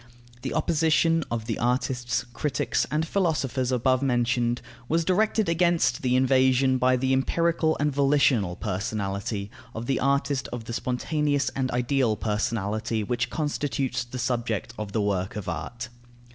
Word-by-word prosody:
The -, -, -4 dB
opposition 165 Hz, +1 st, +2 dB
of 115 Hz, -2 st, -3 dB
the 115 Hz, -2 st, -3 dB
artists, 125 Hz, +1 st, 0 dB
critics, 150 Hz, +2 st, -1 dB
and 155 Hz, +2 st, 0 dB
philosophers 140 Hz, -9 st, 0 dB
above 130 Hz, +1 st, +2 dB
mentioned, 120 Hz, -2 st, +1 dB, 0.3 s
was 165 Hz, +1 st, +1 dB
directed 215 Hz, +3 st, +2 dB
against 165 Hz, -7 st, +2 dB
the 125 Hz, -1 st, +1 dB
invasion 130 Hz, 0 st, +3 dB
by 130 Hz, +1 st, +4 dB
the 130 Hz, +1 st, +1 dB
empirical 160 Hz, +4 st, +1 dB
and 150 Hz, +1 st, +1 dB
volitional 135 Hz, -9 st, +3 dB
personality 100 Hz, 0 st, -3 dB, 0.2 s
of 110 Hz, +1 st, -4 dB
the 135 Hz, +1 st, 0 dB
artist 140 Hz, 0 st, +1 dB
of 120 Hz, -2 st, -5 dB
the 115 Hz, -, -5 dB
spontaneous 145 Hz, +3 st, 0 dB
and 130 Hz, -1 st, -2 dB
ideal 125 Hz, -2 st, +1 dB
personality 110 Hz, 0 st, -1 dB
which 120 Hz, +4 st, -1 dB
constitutes 140 Hz, -4 st, -1 dB
the 120 Hz, +1 st, -8 dB
subject 120 Hz, -3 st, -2 dB
of 105 Hz, -3 st, -5 dB
the 110 Hz, -, 0 dB
work 95 Hz, -2 st, -1 dB
of 105 Hz, -3 st, -5 dB
art. 120 Hz, +8 st, -5 dB
125 Hz, 145 wpm, -26 LUFS, 115-140 Hz, 0.3 s, by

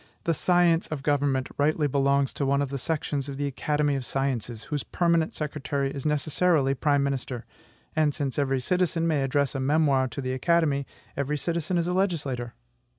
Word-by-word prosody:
The 165 Hz, -, +1 dB
science 175 Hz, 0 st, +3 dB
of 145 Hz, -3 st, -5 dB
government 140 Hz, -2 st, +1 dB
rightly 150 Hz, +1 st, +2 dB
belongs 140 Hz, -1 st, +2 dB
to -, -, -3 dB
one 140 Hz, +1 st, +2 dB
of 140 Hz, -, -3 dB
the 140 Hz, 0 st, -4 dB
sections 145 Hz, -1 st, -2 dB
of 135 Hz, -, -5 dB
the 145 Hz, -, -1 dB
Academy 145 Hz, +1 st, 0 dB
of 135 Hz, -, -2 dB
Sciences, 125 Hz, -4 st, -2 dB
whose 150 Hz, -2 st, -3 dB
permanent 170 Hz, 0 st, +1 dB
secretary 140 Hz, -2 st, -2 dB
is 140 Hz, +1 st, -3 dB
necessarily 150 Hz, -1 st, +2 dB
prime 145 Hz, 0 st, +2 dB
minister; 130 Hz, -3 st, -3 dB, 0.5 s
and, 155 Hz, -1 st, +3 dB
since 140 Hz, -1 st, -3 dB
every 135 Hz, -2 st, +1 dB
citizen 175 Hz, +2 st, +1 dB
may 155 Hz, -4 st, +2 dB
address 135 Hz, +1 st, +1 dB
a 135 Hz, -, -2 dB
memoir 140 Hz, -1 st, +3 dB
to 125 Hz, -, -7 dB
the 130 Hz, -1 st, -2 dB
Academy, 145 Hz, -1 st, +1 dB, 0.3 s
every 140 Hz, +2 st, -1 dB
citizen 170 Hz, +2 st, -1 dB
is 170 Hz, -, +1 dB
a 180 Hz, -, -1 dB
legislator. 145 Hz, -11 st, -1 dB
145 Hz, 180 wpm, -26 LUFS, 135-160 Hz, 0.5 s, science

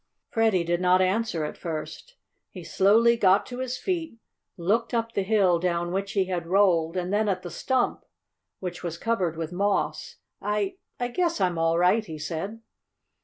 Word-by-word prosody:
Freddie 220 Hz, -6 st, +2 dB
did 170 Hz, +1 st, -1 dB
not 180 Hz, 0 st, +4 dB
answer 185 Hz, -3 st, 0 dB
at -, -, -7 dB
first. 170 Hz, -, -6 dB, 0.3 s
He 180 Hz, -, -10 dB
slowly 225 Hz, +7 st, +4 dB
got 195 Hz, -3 st, +4 dB
to 245 Hz, 0 st, -7 dB
his 255 Hz, -1 st, -3 dB
feet, 335 Hz, -9 st, -3 dB, 0.4 s
looked 225 Hz, +7 st, 0 dB
up 230 Hz, 0 st, -1 dB
the 200 Hz, -, -1 dB
hill 190 Hz, -4 st, +3 dB
down 175 Hz, -1 st, -1 dB
which 195 Hz, +1 st, -2 dB
he 195 Hz, -2 st, +2 dB
had 175 Hz, -2 st, -3 dB
rolled, 180 Hz, -3 st, +3 dB
and 180 Hz, +2 st, -2 dB
then 210 Hz, 0 st, +2 dB
at 185 Hz, -2 st, -1 dB
the 175 Hz, -, -7 dB
stump, 255 Hz, +8 st, 0 dB, 0.6 s
which 180 Hz, -1 st, -5 dB
was 170 Hz, -1 st, -4 dB
covered 185 Hz, -8 st, -1 dB
with 165 Hz, 0 st, -4 dB
moss. 200 Hz, +2 st, -1 dB, 0.3 s
"I 205 Hz, -1 st, -1 dB, 0.2 s
I 245 Hz, 0 st, -1 dB
guess 340 Hz, +5 st, 0 dB
I'm 180 Hz, -3 st, +1 dB
all 165 Hz, 0 st, +2 dB
right," 180 Hz, +6 st, +3 dB
he 160 Hz, -7 st, -8 dB
said. 165 Hz, +9 st, -5 dB
190 Hz, 175 wpm, -26 LUFS, 175-225 Hz, 0.6 s, not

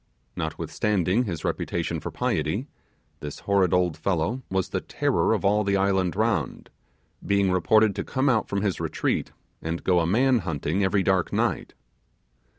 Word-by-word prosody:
Notwithstanding 95 Hz, +6 st, 0 dB
his 85 Hz, -7 st, -4 dB
reputation 85 Hz, -1 st, -2 dB
for -, -, -5 dB
piety, -, -, -1 dB, 0.5 s
this 75 Hz, -1 st, -7 dB
horrid 100 Hz, -3 st, +2 dB
old 90 Hz, -3 st, +2 dB
fellow 100 Hz, +7 st, -1 dB
was 95 Hz, -1 st, -1 dB
the -, -, -2 dB
terror -, -, 0 dB
of -, -, 0 dB
all 105 Hz, +2 st, +3 dB
the 100 Hz, 0 st, +1 dB
island 95 Hz, -2 st, +1 dB
round, 105 Hz, -, -1 dB, 0.5 s
being 100 Hz, -1 st, +2 dB
reported 105 Hz, +3 st, +3 dB
to -, -, -1 dB
come 130 Hz, +2 st, -1 dB
out 115 Hz, -5 st, +2 dB
from 100 Hz, 0 st, -1 dB
his 100 Hz, -3 st, -1 dB
retreat, -, -, -1 dB, 0.3 s
and 85 Hz, +1 st, -4 dB
go 90 Hz, -2 st, +3 dB
a 85 Hz, -, +1 dB
man 125 Hz, +6 st, +3 dB
hunting 80 Hz, +1 st, -2 dB
every 95 Hz, 0 st, +2 dB
dark 95 Hz, -2 st, +1 dB
night. -, -, -1 dB
95 Hz, 155 wpm, -25 LUFS, 85-105 Hz, 0.5 s, all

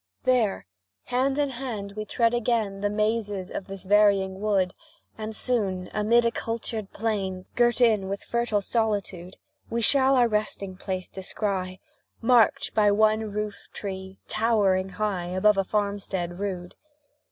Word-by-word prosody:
There 235 Hz, -, +2 dB, 0.4 s
hand 265 Hz, +2 st, 0 dB
in 285 Hz, -2 st, +1 dB
hand 235 Hz, -6 st, -5 dB
we 215 Hz, +1 st, -5 dB
tread 230 Hz, +1 st, +1 dB
again 220 Hz, -4 st, 0 dB
The 205 Hz, -, +1 dB
mazes 210 Hz, -2 st, -1 dB
of 195 Hz, -, -5 dB
this 195 Hz, -1 st, -7 dB
varying 195 Hz, -1 st, +3 dB
wood, 195 Hz, -4 st, +1 dB, 0.4 s
And 220 Hz, 0 st, -5 dB
soon, 195 Hz, -8 st, 0 dB
amid 230 Hz, +3 st, +3 dB
a 235 Hz, -, +3 dB
cultured 225 Hz, -3 st, -4 dB
plain, 195 Hz, -4 st, -2 dB
Girt 240 Hz, 0 st, +3 dB
in 215 Hz, -5 st, +3 dB
with 200 Hz, 0 st, -4 dB
fertile 235 Hz, -3 st, 0 dB
solitude, 200 Hz, -5 st, -2 dB, 0.3 s
We 230 Hz, 0 st, -1 dB
shall 270 Hz, +3 st, +4 dB
our 245 Hz, -2 st, +5 dB
resting 210 Hz, -3 st, -2 dB
place 185 Hz, -1 st, -4 dB
descry, 190 Hz, -1 st, -3 dB, 0.4 s
Marked 240 Hz, -1 st, +3 dB
by 210 Hz, -1 st, +4 dB
one 215 Hz, +1 st, +2 dB
roof 210 Hz, -1 st, -4 dB
tree, 190 Hz, -1 st, -6 dB
towering 205 Hz, -4 st, +2 dB
high 200 Hz, -5 st, -1 dB
Above 195 Hz, +3 st, +3 dB
a -, -, +3 dB
farmstead 195 Hz, -3 st, -2 dB
rude. 185 Hz, -3 st, -4 dB
210 Hz, 140 wpm, -26 LUFS, 190-230 Hz, 0.4 s, our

